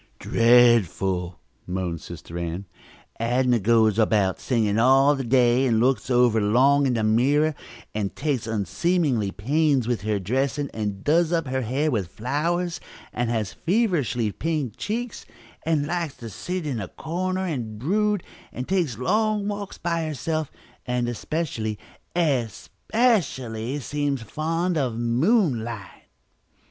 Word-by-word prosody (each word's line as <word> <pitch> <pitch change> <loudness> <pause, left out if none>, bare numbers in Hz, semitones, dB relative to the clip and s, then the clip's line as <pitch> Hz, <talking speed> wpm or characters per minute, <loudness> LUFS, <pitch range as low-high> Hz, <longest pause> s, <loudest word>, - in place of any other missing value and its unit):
"Dreadful!" 100 -7 +3 0.3
moaned 90 -3 -3
Sister 85 0 -10
Ann. 85 +3 -4 0.5
"Adnah 120 +1 +2
goes 110 0 +3
about 105 -4 +2
sighing 110 -4 +1
all 135 +4 +5
the 135 - -3
day, 125 +1 +3
and 115 -3 +2
looks 130 +2 +1
over 120 -3 +4
long 135 +7 +4
in 125 - +1
the 110 - 0
mirror, 140 +8 +3 0.4
and 105 -2 -3
takes 140 -6 -1
unseemly 110 - 0
pains 135 - +1
with 120 -2 -1
her 105 0 0
dressing, 135 +8 -1
and 105 -3 -4
does 165 +2 +3
up 165 -2 +1
her 130 0 -1
hair 135 +6 0
with 105 -8 -1
flowers, 165 - -2 0.3
and 120 -1 -1
has 110 -4 -1
feverishly 165 - 0
pink 150 -4 -2
cheeks, 235 +2 -4 0.4
and 155 -3 +2
likes 165 -3 -3
to 115 -2 -8
sit 180 - -4
in 135 -6 -2
a 95 - -5
corner 185 - -3
and 120 -11 -4
brood, 205 - 0 0.3
and 125 - -6
takes 175 - 0
long 210 - +1
walks 205 -1 -5
by 170 -1 -1
herself, 155 +1 -2 0.3
and 125 -1 -1
especially, 120 -4 -3 0.4
especially, 135 - 0
seems 145 -2 -2
fond 165 - -1
of 125 -5 -1
moonlight!" 120 - 0
130 Hz, 135 wpm, -24 LUFS, 110-160 Hz, 0.5 s, all